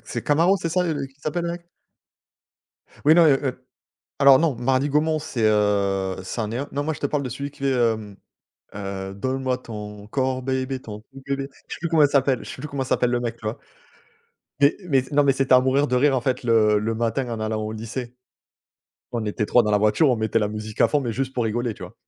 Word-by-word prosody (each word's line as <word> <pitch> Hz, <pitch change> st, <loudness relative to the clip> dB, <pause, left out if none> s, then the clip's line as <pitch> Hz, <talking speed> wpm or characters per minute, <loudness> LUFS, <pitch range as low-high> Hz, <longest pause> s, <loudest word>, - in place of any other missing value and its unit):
c'est -, -, -4 dB
Camaro, 170 Hz, +6 st, +3 dB
c'est 165 Hz, -2 st, -3 dB
ça 180 Hz, +2 st, +1 dB
le, 175 Hz, -, -1 dB
heu, -, -, -3 dB
qu'il 135 Hz, +1 st, -24 dB
s'appelle, 170 Hz, +4 st, -2 dB
le 170 Hz, -, -2 dB
mec? 175 Hz, 0 st, -7 dB, 1.4 s
Oui 155 Hz, -, +8 dB
non, 170 Hz, -1 st, +6 dB
heu, 140 Hz, -3 st, +5 dB
heu, 130 Hz, -1 st, -4 dB, 0.5 s
alors 140 Hz, -1 st, +7 dB
non, 155 Hz, -6 st, +1 dB
Marly-Gomont 145 Hz, +5 st, +1 dB
c'est, 125 Hz, -6 st, -4 dB
heu, 100 Hz, -3 st, +1 dB
c'en 105 Hz, +3 st, -4 dB
est 115 Hz, -, -3 dB
un 140 Hz, +3 st, -3 dB
non, 145 Hz, +1 st, -2 dB
moi 160 Hz, +1 st, -1 dB
je -, -, -12 dB
te -, -, -2 dB
parle 145 Hz, 0 st, 0 dB
de 130 Hz, -, -4 dB
celui 140 Hz, +4 st, -5 dB
qui -, -, -21 dB
fait, 135 Hz, 0 st, +1 dB
hem, 110 Hz, -5 st, 0 dB, 0.6 s
heu 95 Hz, -1 st, -5 dB
«Donne-moi 130 Hz, +3 st, -1 dB
ton 105 Hz, -4 st, -9 dB
corps 130 Hz, +2 st, -1 dB
baby, 130 Hz, 0 st, -2 dB
ton 105 Hz, -1 st, -8 dB
cou 135 Hz, +4 st, -15 dB
bébé», 140 Hz, 0 st, -2 dB, 0.2 s
je -, -, -6 dB
sais -, -, -8 dB
plus 170 Hz, -, -2 dB
comment 160 Hz, -2 st, +4 dB
elle 145 Hz, -, +4 dB
s'appelle, 135 Hz, -2 st, +2 dB
je -, -, -10 dB
sais 130 Hz, -, -8 dB
plus 150 Hz, -, -5 dB
comment 140 Hz, -2 st, -3 dB
s'appelle 125 Hz, -1 st, +1 dB
le 120 Hz, -, 0 dB
mec, 120 Hz, -1 st, -3 dB
tu 110 Hz, -, -13 dB
vois? 110 Hz, -, -3 dB, 1.0 s
Mais 140 Hz, +1 st, +4 dB
mais 135 Hz, -4 st, +4 dB
c 130 Hz, +2 st, -9 dB
non 145 Hz, 0 st, +4 dB
mais 140 Hz, -, +4 dB
c'était 135 Hz, -1 st, +2 dB
à 125 Hz, -, +7 dB
mourir 135 Hz, +3 st, +2 dB
de 125 Hz, -, 0 dB
rire 135 Hz, +1 st, +3 dB
en 125 Hz, -, +1 dB
fait, 130 Hz, +1 st, -1 dB
le 110 Hz, -2 st, +4 dB
le 110 Hz, +2 st, -2 dB
matin 120 Hz, +3 st, -1 dB
en 115 Hz, -, -4 dB
allant 110 Hz, 0 st, -2 dB
au 105 Hz, -, -4 dB
lycée. 120 Hz, +3 st, -6 dB, 1.0 s
On 115 Hz, -2 st, -2 dB
était 105 Hz, 0 st, -2 dB
3 120 Hz, -, +4 dB
dans 105 Hz, -, -1 dB
la 105 Hz, -, +3 dB
voiture 110 Hz, +8 st, +3 dB
on 125 Hz, -, +2 dB
mettait 110 Hz, +1 st, 0 dB
la 105 Hz, -2 st, 0 dB
musique 105 Hz, +1 st, -7 dB
à -, -, +5 dB
fond 150 Hz, -, +1 dB
mais 120 Hz, -4 st, -2 dB
juste 130 Hz, +3 st, -3 dB
pour 125 Hz, -3 st, -1 dB
rigoler, 120 Hz, +2 st, -1 dB
tu -, -, -12 dB
vois. -, -, -12 dB
130 Hz, 250 wpm, -23 LUFS, 110-140 Hz, 1.4 s, Oui